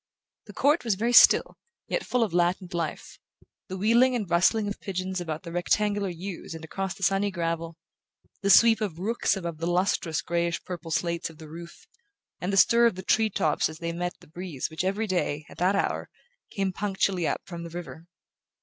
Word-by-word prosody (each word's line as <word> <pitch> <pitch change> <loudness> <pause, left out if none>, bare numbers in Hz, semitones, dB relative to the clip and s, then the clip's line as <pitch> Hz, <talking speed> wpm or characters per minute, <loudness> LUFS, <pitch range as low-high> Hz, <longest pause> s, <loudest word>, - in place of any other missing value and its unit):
The - - -10
court 295 +4 +2
was 225 -5 +1
very 230 +5 0
still, - - +6 0.3
yet - - -1
full 250 -1 +1
of 215 - -3
a - - -2
latent 175 +1 +1
life: 165 -3 -4 0.5
the 190 - -5
wheeling 235 +6 +4
and 215 -5 -2
rustling 190 +5 +3
of 205 - -5
pigeons 185 -1 -3
about 160 -2 -5
the 170 - -8
rectangular 205 +3 0
yews 175 -1 -7
and 160 0 -8
across 190 +2 -4
the 195 - -9
sunny 195 +1 +2
gravel; 165 -2 -3 0.6
the 200 - 0
sweep 225 +2 +6
of 195 -7 -3
rooks 215 +3 0
above 170 -4 -5
the 165 - -2
lustrous 175 -2 0
greyish 170 0 -1
purple 175 -2 -7
slates 170 +1 -1
of 165 - -15
the 160 -1 -11
roof, 170 +2 -11 0.5
and 180 - -2
the 195 - 0
stir 235 +4 +6
of 230 - -1
the 185 - -7
tree 220 +3 +2
tops 155 -7 +1
as 155 - -9
they 170 0 -4
met 175 +1 -3
the - - -17
breeze 160 -4 -5
which 160 - -3
every 200 +4 0
day, 165 -6 -1
at - - -12
that 185 +3 +2
hour, 195 - -1 0.4
came 195 -2 -2
punctually 190 -3 0
up - - -1
from 170 -2 -7
the 170 - -7
river. 170 -1 -8
180 Hz, 205 wpm, -27 LUFS, 170-200 Hz, 0.6 s, still